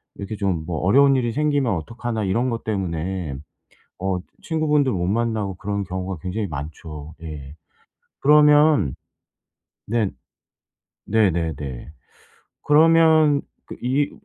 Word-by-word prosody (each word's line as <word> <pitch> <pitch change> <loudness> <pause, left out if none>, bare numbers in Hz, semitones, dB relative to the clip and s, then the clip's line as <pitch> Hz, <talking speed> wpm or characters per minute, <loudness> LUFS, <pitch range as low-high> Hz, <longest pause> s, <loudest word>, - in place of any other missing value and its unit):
이렇게 100 +1 -6
좀 95 -5 -1
뭐 80 -2 -3
'어려운 135 - +4
일이 120 -2 -1
생기면 145 -5 +1
어떡하나.' 115 +6 -4
이런 115 +7 0
것 115 -1 -4
때문에 90 -5 -3 0.7
어 95 -1 -1 0.2
친구분들 150 -4 +1
못 90 -6 -1
만나고 110 -2 -1
그런 100 +1 -3
경우가 95 -1 -5
굉장히 100 +3 -3
많죠. 75 0 -8
예. 75 -3 -8 0.7
그러면 150 - +5 0.9
네. 110 -2 0 1.0
네네네. 80 - -1 0.7
그러면 155 -1 +5 0.2
그 - - -9
이 135 +4 +1
105 Hz, 230 characters per minute, -22 LUFS, 85-140 Hz, 1.0 s, 그러면